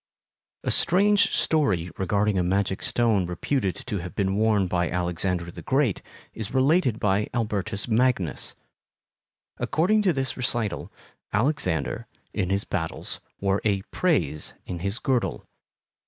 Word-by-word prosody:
A - - 0
strange 200 +4 +4
story 95 - +1
regarding 100 +1 +1
a - - +2
magic 95 +1 0
stone 110 -7 +2
reputed 95 +3 -1
to 105 -6 -2
have 90 +1 -7
been 95 -1 0
worn 105 -2 +3
by 90 -1 0
Alexander 90 0 -1
the - - -9
Great 135 -6 +1 0.3
is 110 +3 -5
related 130 - +3
by 105 +1 +1
Albertus 105 -2 -1
Magnus. 115 - +1 1.0
According 205 +7 +2
to 195 -3 +3
this 135 -4 -2
recital, 120 -4 -1 0.4
Alexander, 105 - 0 0.3
in 90 - -1
his 100 +1 +1
battles, 80 -4 -3 0.2
wore 100 0 +1
a 100 -3 +1
"prase" 85 - 0
in 90 - -5
his 100 +5 -2
girdle. 125 -2 -1
105 Hz, 130 wpm, -25 LUFS, 90-130 Hz, 1.0 s, strange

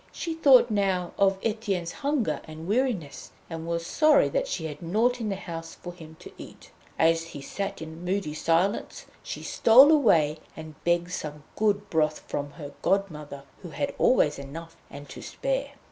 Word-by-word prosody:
She 330 - -4
thought 270 -7 +5
now 190 -4 0
of 195 -1 +4
Etienne's 205 -6 -2
hunger 285 -1 -1
and 160 +1 -9
weariness, 210 - -2 0.2
and 165 0 -6
was 170 0 -2
sorry 305 - +4
that - - -1
she 165 - -3
had 150 0 -7
nought 230 +8 +1
in 215 - -2
the 195 - -1
house 165 -3 -7
for 175 - -9
him 160 -2 -13
to - - -11
eat. - - -12 0.3
And 160 - +5
as 165 0 +1
he 165 -4 -9
sat 195 0 -5
in 160 +2 -9
moody 185 -4 -2
silence 170 +6 0 0.2
she - - -7
stole 260 +6 +6
away, 165 - +3 0.2
and 160 -1 -8
begged 175 +1 +1
some 150 -4 -6
good 205 -1 +1
broth 155 -1 +1
from 145 0 -5
her 145 -3 -9
godmother, 150 -8 -2 0.2
who 175 - -8
had 280 - -3
always 150 - +3
enough 165 +4 -9
and 145 +1 -10
to - - -9
spare. - - -3
175 Hz, 175 wpm, -26 LUFS, 160-220 Hz, 0.3 s, stole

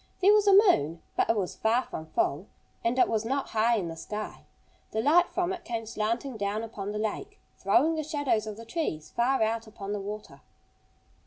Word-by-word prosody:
There 395 +2 +6
was 420 -1 +4
a 400 - +7
moon. 170 - +4
But - - +1
it 225 - +3
was 190 -3 -2
far 230 +3 +2
from 160 -8 -7
full. 155 +4 -1 0.4
And 235 +2 +1
it - - +5
was 220 -1 0
not 270 +4 -2
high 225 +2 +2
in 185 -5 -2
the 165 - -6
sky. 210 +6 -6 0.5
The 220 - 0
light 330 +9 +4
from 360 0 -1
it 360 -1 -7
came 230 -1 -4
slanting 230 +3 -2
down 205 +2 -2
upon 205 -3 -5
the 210 - -4
lake, 215 0 -4 0.2
throwing 255 +11 +3
the 315 - -1
shadows 290 -8 0
of 215 -1 -6
the 230 - -9
trees 225 - -3
far 245 +1 +2
out 225 +1 -1
upon 205 -2 -6
the 205 - -3
water. 210 +2 -7
225 Hz, 210 wpm, -28 LUFS, 210-275 Hz, 0.5 s, a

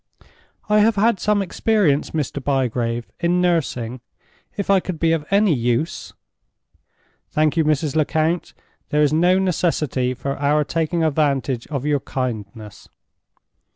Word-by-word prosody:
"I 210 0 +4
have 215 +1 +4
had 210 0 +2
some 210 0 +1
experience, 190 -6 +1
Mr. 145 -3 -3
Bygrave, 120 -4 -1
in 175 +1 +1
nursing. 130 -9 -1 0.6
If 200 - -2
I 195 - +5
could 180 -3 -6
be 165 -1 +2
of 165 -2 0
any 200 -2 +3
use—" 120 +5 -2 1.2
"Thank 155 0 +1
you, 165 - +3
Mrs. 150 -1 0
Lecount. 160 +2 0 0.3
There 150 0 +2
is 145 0 +2
no 175 +4 +4
necessity 155 -8 0
for 140 +2 -4
our 145 +2 +2
taking 165 +2 -1
advantage 140 -5 0
of 140 -2 -4
your 145 -1 +1
kindness." 110 -6 -6
150 Hz, 135 wpm, -21 LUFS, 135-175 Hz, 1.2 s, I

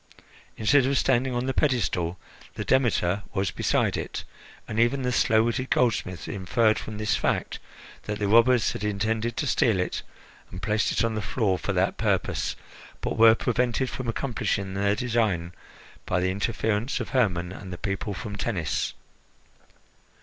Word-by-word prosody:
Instead 130 +5 +4
of 140 0 +2
standing 130 0 +2
on 120 +1 -1
the 135 - -1
pedestal, 95 - 0 0.4
the - - -4
Demeter 105 -7 +2
was 95 -2 0
beside - - +1
it, - - -4 0.4
and 110 - -3
even 120 +3 +2
the 125 - 0
slow 110 -2 +3
witted 120 +3 -1
goldsmith 100 -8 0
inferred 110 +3 +1
from 110 - -7
this 105 0 +1
fact - - -1 0.5
that 105 0 -3
the 105 -1 -1
robbers 115 +2 +5
had - - -6
intended 110 +3 -1
to - - 0
steal 115 -6 +2
it 90 - -2 0.5
and 90 - -8
placed 105 +1 +1
it - - +1
on 115 -1 0
the 110 - -2
floor 100 -2 0
for - - -2
that - - +1
purpose, - - 0 0.4
but - - -3
were 115 0 +7
prevented 125 +2 0
from 130 - -5
accomplishing 110 -6 -2
their 100 +1 +1
design 105 -8 0 0.5
by 90 - +1
the 95 +1 +1
interference 110 +4 -1
of - - -4
Hermon 90 -9 +1
and 95 -1 -9
the 90 - -5
people 100 +1 -3
from 105 0 -6
Tennis. 100 -6 -2
110 Hz, 165 wpm, -26 LUFS, 100-120 Hz, 0.5 s, were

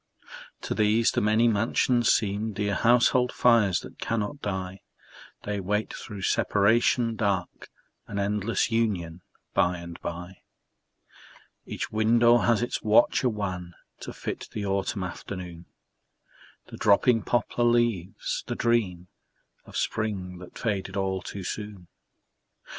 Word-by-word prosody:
To - - -3
these 110 +2 +3
the - - 0
many 110 +3 +3
mansions 115 +2 +2
seem 105 +1 0
Dear 100 0 -1
household 125 +4 +3
fires 110 -8 +3
that - - -12
cannot 115 +5 -2
die; 95 -1 -4 0.6
They 105 -1 -3
wait 105 +3 -1
through 100 -3 -8
separation 115 +4 +2
dark 100 -4 -2 0.4
An 100 - -6
endless 105 +2 0
union 95 -7 -1 0.3
by 90 0 +2
and 85 0 -9
by. 90 +2 -6 1.3
Each - - -5
window 115 +2 +4
has 120 -1 +2
its 120 - -3
watcher 115 +4 +4
wan 90 -5 -4 0.2
To - - -7
fit - - -6
the 105 -2 -4
autumn 100 0 -1
afternoon, 90 -1 -7 1.0
The - - -9
dropping 115 +3 +4
poplar 120 +2 0
leaves, 120 -6 0
the - - -3
dream 100 -7 0 0.6
Of - - -8
spring 95 -4 -2
that 90 -1 -12
faded 100 -4 -2
all 95 -1 -1
too 95 +2 -7
soon. 100 -2 -6
105 Hz, 125 wpm, -26 LUFS, 95-115 Hz, 1.3 s, window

